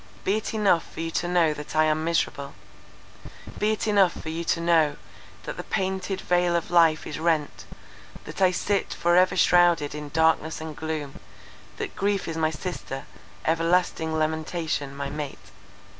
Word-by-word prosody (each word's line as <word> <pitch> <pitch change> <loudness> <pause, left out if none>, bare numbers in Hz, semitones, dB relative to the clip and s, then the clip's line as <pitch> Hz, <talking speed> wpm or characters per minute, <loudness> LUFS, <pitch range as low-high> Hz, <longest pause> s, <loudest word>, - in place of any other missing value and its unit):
Be 200 +3 +1
it 220 +1 -4
enough 200 -6 +2
for - - -10
you 165 0 -3
to 175 - -1
know 175 -3 +3
that 150 +1 -8
I 155 - +5
am 155 0 +1
miserable—be 165 +6 -4
it 215 - -2
enough 200 -4 +4
for 160 - -6
you 165 +1 -3
to 165 - +1
know, 165 -3 +3 0.5
that - - -6
the - - -5
painted 190 -1 -2
veil 175 -1 +2
of 170 - -2
life 165 -3 +4
is - - -5
rent, 160 -3 0 0.6
that - - -8
I 185 - +6
sit 195 +2 -1
for 175 0 +2
ever 185 +1 +4
shrouded 175 -4 +4
in 150 -1 -6
darkness 160 +1 +1
and 160 -1 -7
gloom, 155 -1 -5 0.6
that - - -5
grief 200 0 0
is 165 - -4
my 160 -1 +1
sister, 155 -4 -6 0.4
everlasting 165 -1 +1
lamentation 155 -2 -2
my 140 0 -4
mate!" 145 -2 -7
165 Hz, 165 wpm, -25 LUFS, 155-180 Hz, 0.6 s, I